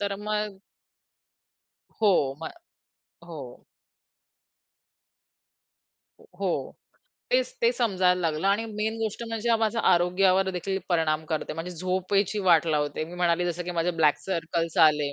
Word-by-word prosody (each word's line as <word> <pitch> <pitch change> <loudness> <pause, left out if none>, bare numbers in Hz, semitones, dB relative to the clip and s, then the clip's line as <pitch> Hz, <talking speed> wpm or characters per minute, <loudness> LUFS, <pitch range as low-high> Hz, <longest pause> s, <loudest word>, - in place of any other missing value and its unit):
तर 200 -1 -1
मग. 210 -1 -3 1.4
हो, 175 -10 +3
मग - - -5 0.7
हो. 145 -8 -10 2.8
हो 195 -2 0 0.8
तेच, - - +2
तेच 470 +1 +4
समजायला 185 -5 +2
लागलं 160 +1 -1
आणि 205 +3 +2
मेन 220 0 -3
गोष्ट 220 0 -3
म्हणजे 230 +1 0
माझा 225 +1 0
आरोग्यावर 185 +2 +3
देखील 190 +2 -3
परिणाम 160 -3 +1
करते. 155 0 -3
म्हणजे 165 +3 -5
झोपेची 185 +3 0
वाट 170 -2 +5
लावते. 150 -1 -1
मी 170 +2 -10
म्हणाले 175 0 +1
जसं 175 0 -3
की 180 - -4
माझे 170 +2 +2
ब्लॅक 150 -2 +4
सर्कल्स 165 -2 -2
आले, 150 -2 +1
180 Hz, 125 wpm, -26 LUFS, 165-205 Hz, 2.8 s, वाट